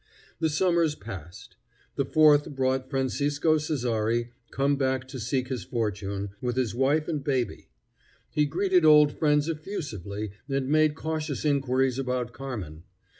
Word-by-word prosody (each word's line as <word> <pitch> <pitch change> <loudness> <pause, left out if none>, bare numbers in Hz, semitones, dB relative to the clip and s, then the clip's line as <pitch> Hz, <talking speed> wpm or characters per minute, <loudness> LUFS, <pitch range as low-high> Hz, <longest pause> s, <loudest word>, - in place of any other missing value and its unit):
The 160 - +1
summers 165 -1 +2
passed. 85 - -10 0.4
The - - 0
fourth 150 -2 +5
brought 130 0 0
Francisco 145 +3 +1
Cessari, 120 -6 -1 0.2
come 140 +1 +1
back 130 -2 -1
to 130 - -6
seek 130 +2 -1
his 125 -7 -3
fortune, 100 -2 -3
with 125 -1 -1
his 130 -4 0
wife 140 +5 +1
and 150 -4 -2
baby. 130 -4 -2 0.6
He 150 -1 +2
greeted 185 +3 +2
old 150 -1 +7
friends 150 0 +2
effusively 115 - -5 0.2
and 135 -1 -1
made 155 0 +3
cautious 155 -2 -3
inquiries 135 -2 +1
about 125 -2 -2
Carmen. 105 - -6
135 Hz, 135 wpm, -27 LUFS, 120-150 Hz, 0.6 s, old